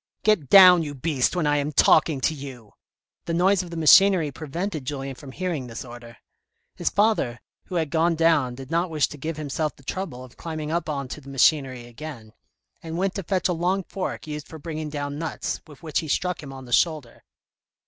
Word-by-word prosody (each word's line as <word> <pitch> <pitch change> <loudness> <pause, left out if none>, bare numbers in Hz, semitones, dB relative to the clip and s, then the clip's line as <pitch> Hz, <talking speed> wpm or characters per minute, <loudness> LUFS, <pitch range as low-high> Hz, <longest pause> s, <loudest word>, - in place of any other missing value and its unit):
"Get 200 -11 +2
down, 180 -1 +9
you 145 -3 -5
beast, 140 +1 0
when 175 -3 0
I 145 0 +2
am 145 +1 -1
talking 150 -1 +4
to 160 - +1
you," 130 -8 -10 0.5
the 165 - -2
noise 190 +2 +3
of 180 - -9
the 170 - -6
machinery 165 0 +6
prevented 160 +3 -4
Julien 135 0 -4
from 130 +1 -11
hearing 165 -5 -3
this 115 +2 -7
order. 120 -1 -11 0.6
His - - 0
father, 205 - +1 0.3
who 185 - -7
had 160 -4 -1
gone 165 +1 +2
down 160 -6 +2
did 135 0 -10
not 170 +2 +1
wish 155 -3 +1
to 150 - -9
give 155 +2 -4
himself 150 0 -2
the 135 - -20
trouble 150 -5 -5
of 130 - -15
climbing 155 -2 -5
up 170 -1 -1
on 140 -3 -3
to 150 - -7
the 140 - -12
machinery 135 -2 +2
again, 120 -3 -10 0.5
and 165 0 -6
went 190 +1 0
to 195 - -3
fetch 185 +1 0
a 180 - 0
long 180 +3 0
fork 190 +1 -5
used 150 -1 -6
for 160 - -10
bringing 155 0 -5
down 145 0 -4
nuts, 165 -1 -4
with 150 -1 -15
which 155 -3 -1
he 160 - -5
struck 180 +4 -1
him 140 -3 -9
on 135 -1 -9
the 120 - -6
shoulder. 155 -7 0
155 Hz, 210 wpm, -24 LUFS, 135-170 Hz, 0.6 s, down